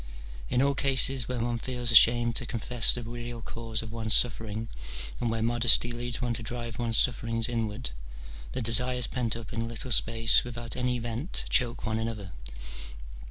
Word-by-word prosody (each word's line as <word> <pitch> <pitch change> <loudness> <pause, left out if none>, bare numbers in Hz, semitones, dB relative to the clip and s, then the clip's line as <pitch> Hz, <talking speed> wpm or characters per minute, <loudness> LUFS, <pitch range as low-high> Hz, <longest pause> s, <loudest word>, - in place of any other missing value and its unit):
In 125 - +2
all 140 0 +2
cases 135 -2 +5
where 125 - -3
one 120 0 -2
feels 125 -1 -3
ashamed 120 0 +6
to 125 - -3
confess 120 0 +3
the 120 - -1
real 120 +1 -7
cause 115 0 -5
of 110 - -8
one's 110 -1 0
sufPering, 115 -2 +1 0.5
and 120 - -1
where 115 0 -2
modesty 120 0 +3
leads 120 0 -4
one 120 -1 -1
to 115 - -3
drive 120 0 -6
one's 115 -2 0
sufferings 115 -2 +1
inward, 115 0 -3 0.6
the - - -3
desires 125 +2 +3
pent 115 -2 -2
up 115 -3 -8
in 115 - -3
a - - -2
little 115 +2 -4
space 115 0 +3
without 120 -1 -6
any 125 -1 -1
vent 120 - -4
choke 120 -3 +1
one 110 0 -1
another. 110 -4 -5
115 Hz, 175 wpm, -28 LUFS, 115-120 Hz, 0.6 s, ashamed